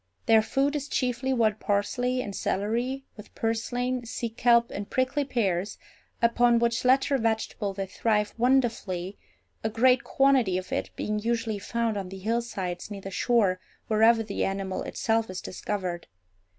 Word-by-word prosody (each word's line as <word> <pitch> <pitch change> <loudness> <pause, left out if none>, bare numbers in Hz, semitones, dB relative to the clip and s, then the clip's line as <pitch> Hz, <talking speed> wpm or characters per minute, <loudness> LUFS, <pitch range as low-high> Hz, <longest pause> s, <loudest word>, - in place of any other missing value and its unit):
Their 220 -1 +6
food 275 +6 0
is 290 -1 -3
chiefly 255 -1 -1
wild 220 -4 +2
parsley 245 +5 0
and 200 -4 -6
celery, 240 +7 -1
with 210 0 -13
purslain, 245 +2 -1
sea 235 0 -3
kelp, 235 0 +3
and 200 0 -5
prickly 260 +3 +1
pears, 205 -8 -1 0.5
upon 235 0 +4
which 235 0 +1
latter 270 +2 +3
vegetable 220 -2 -1
they 195 0 -2
thrive 210 +1 0
wonderfully, 225 -7 0 0.4
a 220 - +1
great 250 +3 +3
quantity 265 -9 +3
of 185 0 -6
it - - -1
being 210 0 -2
usually 225 -1 -1
found 230 +1 -1
on 190 -2 -4
the 190 - -8
hillsides 195 -4 -3
near 200 -2 -7
the 195 - -7
shore 200 -4 +2 0.3
wherever 225 +1 +5
the 205 -2 -3
animal 195 -1 -2
itself 225 -1 -1
is 185 0 -5
discovered. 185 -3 -4
225 Hz, 150 wpm, -27 LUFS, 200-245 Hz, 0.5 s, Their